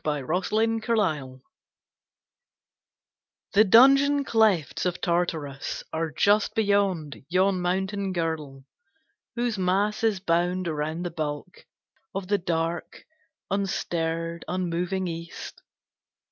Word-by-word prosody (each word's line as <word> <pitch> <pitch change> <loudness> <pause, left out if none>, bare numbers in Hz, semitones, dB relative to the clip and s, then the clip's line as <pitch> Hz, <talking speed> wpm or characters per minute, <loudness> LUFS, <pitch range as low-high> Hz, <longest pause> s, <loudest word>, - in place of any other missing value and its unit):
THE 150 -3 -2
RETURN 215 - +1
OF 220 - -7
HYPERION 150 - 0 2.1
The 210 - +7
dungeon 275 +6 +6
clefts 210 - +2
of 180 - -3
Tartarus 165 -5 -2
Are 160 0 -1
just 205 +7 +2
beyond 200 - 0
yon 185 +1 +2
mountain 190 +2 -1
girdle, 160 -6 -3 0.7
Whose 235 -4 -1
mass 195 +4 +1
is 215 -4 +2
bound 180 0 0
around 155 +2 -2
the 175 - -3
bulk 155 +2 -5 0.5
Of 195 -1 -4
the 205 -1 +2
dark, 165 -1 -3 0.5
unstirred, 170 -4 -2
unmoving 180 +2 -2
East. 165 0 -7
180 Hz, 105 wpm, -26 LUFS, 165-200 Hz, 2.1 s, The